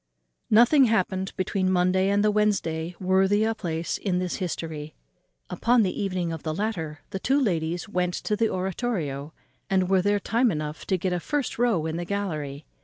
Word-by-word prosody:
_ -, -, -54 dB, 0.5 s
Nothing 245 Hz, +6 st, +6 dB
happened 190 Hz, -4 st, 0 dB
between 185 Hz, 0 st, 0 dB
the -, -, +2 dB
Monday 185 Hz, +1 st, +2 dB
and 200 Hz, +1 st, +2 dB
the 210 Hz, -, +4 dB
Wednesday 180 Hz, -6 st, 0 dB
worthy 190 Hz, +3 st, +3 dB
a 225 Hz, +1 st, +1 dB
place 165 Hz, -6 st, -3 dB
in 185 Hz, -3 st, -1 dB
this 180 Hz, -1 st, -2 dB
history. 160 Hz, -4 st, -5 dB, 0.5 s
Upon 235 Hz, -, +2 dB
the 185 Hz, -, -2 dB
evening 185 Hz, -4 st, -1 dB
of 160 Hz, -, -6 dB
the 155 Hz, -1 st, -3 dB
latter 165 Hz, -8 st, -3 dB
the 190 Hz, -, -3 dB
two 270 Hz, +8 st, +2 dB
ladies 175 Hz, -, -1 dB
went 180 Hz, -3 st, -1 dB
to 210 Hz, -, -1 dB
the 225 Hz, +1 st, +1 dB
oratorio, 180 Hz, -, -2 dB, 0.4 s
and 185 Hz, -2 st, +2 dB
were 190 Hz, -1 st, +5 dB
there 205 Hz, +2 st, +2 dB
time 235 Hz, +5 st, +2 dB
enough 150 Hz, -4 st, -4 dB
to 190 Hz, -, +2 dB
get 180 Hz, +1 st, -1 dB
a 180 Hz, -, 0 dB
first 285 Hz, -, -2 dB
row 225 Hz, -10 st, +2 dB
in 160 Hz, +1 st, -2 dB
the 175 Hz, -, -3 dB
gallery. 155 Hz, -7 st, -3 dB
185 Hz, 190 wpm, -26 LUFS, 165-210 Hz, 0.5 s, Nothing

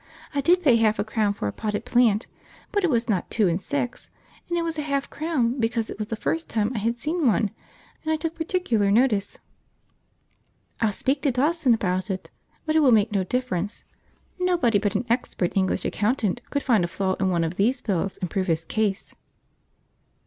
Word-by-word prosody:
I 285 Hz, -, +1 dB
did 355 Hz, +5 st, +3 dB
pay 255 Hz, -7 st, +5 dB
half 220 Hz, -1 st, +3 dB
a -, -, 0 dB
crown 215 Hz, -1 st, 0 dB
for 105 Hz, -, -3 dB
a -, -, -1 dB
potted 215 Hz, +1 st, -3 dB
plant, 240 Hz, -4 st, +3 dB, 0.5 s
but 410 Hz, -1 st, 0 dB
it 360 Hz, -, +3 dB
was 235 Hz, -3 st, +1 dB
not 195 Hz, -6 st, -1 dB
two 215 Hz, -4 st, +2 dB
and 170 Hz, +2 st, 0 dB
six, 265 Hz, -2 st, -3 dB, 0.4 s
and 345 Hz, -, 0 dB
it 340 Hz, -, 0 dB
was 325 Hz, -2 st, -2 dB
a -, -, +1 dB
half 280 Hz, -2 st, -2 dB
crown 275 Hz, -6 st, 0 dB
because 225 Hz, -1 st, -1 dB
it -, -, -8 dB
was 215 Hz, -, -3 dB
the 225 Hz, -, -3 dB
first 325 Hz, +8 st, -2 dB
time 215 Hz, 0 st, 0 dB
I 225 Hz, -, -2 dB
had 230 Hz, +3 st, -1 dB
seen 310 Hz, +3 st, 0 dB
one 215 Hz, -2 st, +2 dB, 0.5 s
and 315 Hz, -, -2 dB
I -, -, +3 dB
took 315 Hz, +1 st, -3 dB
particular 320 Hz, -, 0 dB
notice. 215 Hz, -2 st, +2 dB, 1.4 s
I'll 220 Hz, -2 st, +3 dB
speak 270 Hz, +7 st, -1 dB
to 285 Hz, -, +2 dB
Dawson 280 Hz, 0 st, +2 dB
about 185 Hz, -1 st, -1 dB
it, 190 Hz, -1 st, -4 dB, 0.3 s
but 310 Hz, 0 st, 0 dB
it -, -, +6 dB
will 290 Hz, -4 st, +5 dB
make 220 Hz, -2 st, +4 dB
no 195 Hz, -2 st, +1 dB
difference. 205 Hz, -2 st, -2 dB, 0.6 s
Nobody 335 Hz, -, +2 dB
but 205 Hz, 0 st, -1 dB
an 225 Hz, -, 0 dB
expert 230 Hz, -6 st, -1 dB
English 190 Hz, -1 st, +1 dB
accountant 220 Hz, -1 st, 0 dB
could 285 Hz, -, -1 dB
find 225 Hz, -8 st, +3 dB
a -, -, 0 dB
flaw 190 Hz, +2 st, -1 dB
in 190 Hz, -1 st, +2 dB
one 170 Hz, -2 st, +1 dB
of 165 Hz, +1 st, -2 dB
these 235 Hz, +7 st, +2 dB
bills 195 Hz, -2 st, -1 dB
and 180 Hz, -, -3 dB
prove 190 Hz, -2 st, -1 dB
his 165 Hz, -1 st, 0 dB
case." 205 Hz, +1 st, -1 dB
230 Hz, 205 wpm, -25 LUFS, 200-280 Hz, 1.4 s, it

